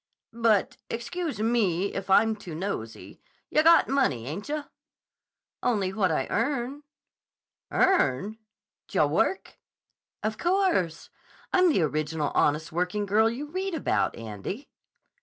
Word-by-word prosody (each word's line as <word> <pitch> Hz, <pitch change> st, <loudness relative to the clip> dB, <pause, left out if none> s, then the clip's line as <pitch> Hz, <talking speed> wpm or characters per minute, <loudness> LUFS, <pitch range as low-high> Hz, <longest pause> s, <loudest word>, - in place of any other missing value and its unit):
"But—excuse 235 Hz, -, -1 dB
me 200 Hz, -5 st, +1 dB
if 195 Hz, 0 st, -5 dB
I'm 220 Hz, +3 st, +5 dB
too 175 Hz, -6 st, -9 dB
nosey—yah 175 Hz, -, -4 dB
got 330 Hz, +1 st, +6 dB
money, 260 Hz, -, +1 dB
ain't 175 Hz, -, -6 dB
yah?" 300 Hz, 0 st, -2 dB, 1.0 s
"Only 200 Hz, -6 st, 0 dB
what 195 Hz, -4 st, +1 dB
I 155 Hz, -, 0 dB
earn." 265 Hz, +3 st, -1 dB, 0.9 s
"Earn? 220 Hz, -, +2 dB, 0.5 s
D' -, -, -13 dB
yah -, -, +5 dB
work?" 385 Hz, -, -1 dB, 0.6 s
"Of 215 Hz, +1 st, -2 dB
course. 345 Hz, -, +1 dB, 0.4 s
I'm 365 Hz, -1 st, +5 dB
the 190 Hz, -, +2 dB
original 155 Hz, 0 st, -1 dB
Honest 150 Hz, +3 st, +1 dB
Working 180 Hz, +5 st, -1 dB
Girl 215 Hz, +3 st, +3 dB
you 285 Hz, +6 st, -6 dB
read 375 Hz, 0 st, -2 dB
about, 310 Hz, -, 0 dB
Andy." 115 Hz, -, -7 dB
215 Hz, 120 wpm, -27 LUFS, 170-285 Hz, 1.0 s, got